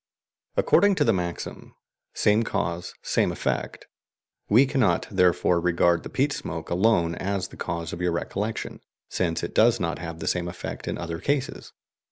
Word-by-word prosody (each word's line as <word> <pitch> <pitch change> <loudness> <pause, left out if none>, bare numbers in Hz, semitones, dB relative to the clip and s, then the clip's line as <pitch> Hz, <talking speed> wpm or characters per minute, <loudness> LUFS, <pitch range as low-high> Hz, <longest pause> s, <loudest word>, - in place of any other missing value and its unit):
According 200 -1 +4
to - - +2
the 115 - +3
maxim 90 -2 -5 0.4
"same 105 +1 +3
cause, 85 -5 -3
same - - +1
effect," - - -3 0.6
we 120 +7 +6
cannot 135 -5 +1
therefore 90 -1 +3
regard 85 0 +2
the - - -8
peat 140 +2 +1
smoke 80 -1 -6
alone 85 -3 +3
as 95 +2 -2
the - - -12
cause 85 -1 -4
of 85 - -6
your 90 -1 +1
recollection, 105 +5 -3 0.3
since 85 -3 -1
it - - -4
does 115 +1 +4
not 85 -3 -2
have 85 -1 -6
the - - -6
same 90 -1 0
effect 90 +1 -6
in - - -2
other 85 -1 -5
cases. 140 +6 -2
90 Hz, 165 wpm, -25 LUFS, 85-110 Hz, 0.6 s, we